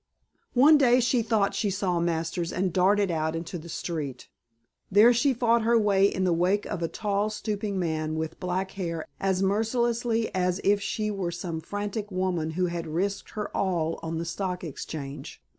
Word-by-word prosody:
One 290 +5 +7
day 250 -2 +5
she 245 0 +2
thought 220 -3 +1
she 210 - 0
saw 185 -3 0
Masters 170 0 -1
and 185 -1 -1
darted 195 +1 +3
out 160 0 -1
into 165 +2 -5
the 170 +2 -11
street. 155 -5 -5 0.6
There 215 +5 +7
she 255 +4 +3
fought 235 -1 +2
her 230 +1 +3
way 200 -2 +4
in 185 - -1
the 180 -2 +3
wake 185 +5 +1
of 195 -5 -4
a 165 - +1
tall 205 +3 -1
stooping 210 -2 -3
man 160 -3 -1
with 160 0 -4
black 185 +1 -2
hair 170 -4 -4
as 190 -1 +1
mercilessly 225 +2 0
as 180 0 0
if 205 0 +3
she 215 +1 -2
were 195 -4 -2
some 170 -1 -4
frantic 205 +3 -4
woman 185 -4 -1
who 185 - +2
had 170 -1 -3
risked 190 +6 -2
her 210 - -4
all 170 -4 0
on 165 0 -3
the 165 - -3
Stock 180 +1 -3
Exchange. 145 -2 -7
190 Hz, 180 wpm, -27 LUFS, 170-210 Hz, 0.6 s, One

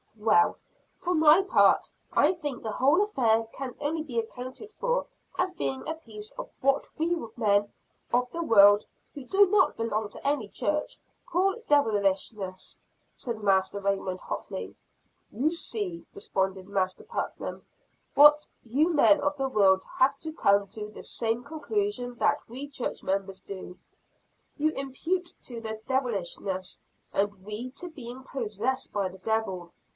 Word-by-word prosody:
"Well, 215 0 +4 0.4
for 360 0 -1
my 315 +3 +7
part, 390 - +4 0.2
I - - +4
think 295 -8 -5
the 220 - -3
whole 280 - +4
affair 230 - +2
can 260 -2 -6
only 310 +2 -1
be 250 -7 -2
accounted 255 - -7
for - - -1 0.3
as 365 0 +1
being 265 -6 -3
a 320 - -2
piece 215 -9 -10
of - - -7
what 275 +1 +2
we 335 +2 +1 0.2
men 205 -3 +2 0.4
of 250 +1 +2
the 340 - -3
world, 205 -5 +7 0.3
who 285 - -8
do 395 +8 +5
not 385 0 +3
belong 220 -2 -1
to 275 - -6
any 280 -7 +1
church, 300 +8 -2 0.3
call 380 +3 +1
devilishness," 200 -7 0 0.3
said 230 -3 -5
Master 195 0 +2
Raymond 195 -2 -1
hotly. - - -5 0.6
"You 275 +9 +1
see," 355 0 -4
responded 190 - -2
Master 190 -2 -1
Putnam, - - -5 0.5
"that 295 +1 +7 0.2
you 290 +9 +2
men 300 0 +5
of 290 0 0
the 270 -1 0
world 190 -5 +4
have 275 +2 +4
to 315 -1 -6
come 200 -9 +3
to 210 +1 -6
the - - -11
same 230 +1 -2
conclusion 315 - -2
that - - +2
we 265 +5 -6
church 270 -3 -4
members 195 0 -2
do. 190 -2 -9 0.8
You 310 +1 +3
impute 325 +7 -2
it - - -37
to 235 -2 -6
'devilishness' 220 -5 -2 0.3
and 200 -1 0
we 215 +5 -5
to 355 +6 -6
being 260 -5 -9
'possessed 255 0 -3
by 200 -2 0
the 190 +1 -13
devil.' 190 -4 -2
245 Hz, 150 wpm, -28 LUFS, 205-300 Hz, 0.8 s, my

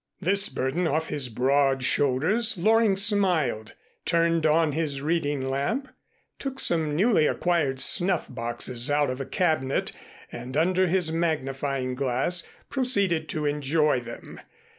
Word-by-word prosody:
This 195 +3 +1
burden 135 +7 -1
off 160 +1 -1
his 140 -4 -1
broad 135 +2 +1
shoulders, 160 - +1
Loring 220 +2 +3
smiled, 185 - +1 0.3
turned 165 -1 +1
on 155 0 +2
his 145 -2 -2
reading 145 -3 -1
lamp, 180 - -2 0.5
took 270 -1 -4
some 160 -3 +1
newly 190 -3 +3
acquired 160 -7 0
snuff 180 +5 +2
boxes 120 +1 -2
out 145 -2 +1
of 130 +1 -5
a 135 - -6
cabinet 155 -7 0 0.4
and 125 +3 -6
under 185 +3 +2
his 175 -2 +1
magnifying 135 -5 -2
glass, 135 +6 0 0.3
proceeded 200 - 0
to 155 -1 -3
enjoy 150 0 +1
them. 120 -1 -10
155 Hz, 130 wpm, -25 LUFS, 135-180 Hz, 0.5 s, Loring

